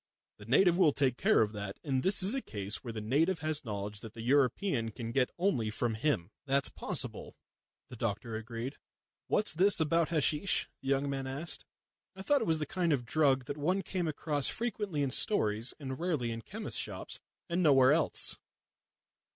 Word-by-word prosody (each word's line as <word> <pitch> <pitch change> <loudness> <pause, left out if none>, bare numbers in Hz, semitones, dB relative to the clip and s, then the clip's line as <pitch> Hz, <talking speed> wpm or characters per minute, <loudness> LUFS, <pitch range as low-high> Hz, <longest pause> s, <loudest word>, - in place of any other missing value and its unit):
The 105 - -12
native 175 +8 +4
will 155 -6 +5
take 130 -4 +1
care - - +3
of 105 -1 +1
that, 100 -2 -6
and 135 -4 0
this 190 +3 +5
is 195 +5 +3
a 270 - -1
case 100 - -2
where 120 - -5
the 110 -1 -5
native 160 - +1
has 155 -1 0
knowledge 105 -2 -4
that 110 +1 -10
the 115 - -7
European 130 - +1
can 115 +1 -6
get 125 +1 +1
only 160 - 0
from 115 +2 -1
him." 110 - -1 0.2
"That's 140 0 +1
possible," - - -3 0.5
the 125 - -10
doctor 115 0 -3
agreed. 115 +4 -6 0.5
"What's 210 - +1
that 190 +5 +3
about 165 +1 +2
hasheesh?" 160 +3 +3 0.2
the 135 - -9
young 140 +1 +1
man 135 -1 -3
asked. 140 +6 -3 0.5
"I 190 - -8
thought 285 +5 +2
it - - -2
was 160 -1 +3
the 155 - -2
kind 175 +2 -1
of 130 -5 0
drug 135 -1 +2
that 145 - -5
one 180 +7 0
came 180 -3 -2
across 145 -2 0
frequently 210 -10 -1
in 135 - -1
stories, 115 - +1
and 130 -2 -6
rarely 155 -9 -1
in 115 0 -5
chemist's 215 - -3
shops, - - -4 0.3
and 175 +1 -1
nowhere 135 -5 +6
else." 155 0 +1
140 Hz, 190 wpm, -31 LUFS, 115-170 Hz, 0.5 s, nowhere